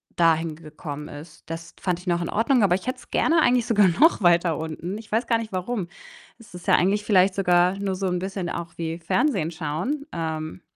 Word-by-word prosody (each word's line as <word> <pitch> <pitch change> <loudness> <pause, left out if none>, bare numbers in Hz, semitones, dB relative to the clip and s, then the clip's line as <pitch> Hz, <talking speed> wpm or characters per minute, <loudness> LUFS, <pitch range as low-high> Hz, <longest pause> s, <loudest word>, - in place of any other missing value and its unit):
dahin 165 -2 +2
gekommen 150 -2 -8
ist. 150 +2 -11
Das 165 0 -7
fand 180 -2 -1
ich 180 - -15
noch 175 0 +1
in 170 - -3
Ordnung, 235 +3 +2
aber 180 -3 +4
ich 190 - -6
hätte 255 - -2
es - - -17
gerne 325 0 +3
eigentlich 245 -4 +3
sogar 210 -4 +4
noch 245 - +4
weiter 170 -2 +3
unten. 160 +5 -5
Ich 225 - -14
weiß 225 +3 +1
gar 230 - +3
nicht 220 -2 -6
warum. 185 0 -3 0.5
Es 230 -5 -17
ist 180 - -10
ja - - +6
eigentlich 200 +3 +2
vielleicht 190 -2 +4
sogar 180 0 +3
nur 195 -2 -2
so 190 0 -2
'n 180 -1 -1
bisschen 190 -2 -4
auch 170 0 -5
wie 165 0 -4
Fernsehen 175 - 0
schauen. 175 - -3
Ähm, 160 +1 -4
180 Hz, 220 wpm, -24 LUFS, 165-210 Hz, 0.5 s, ja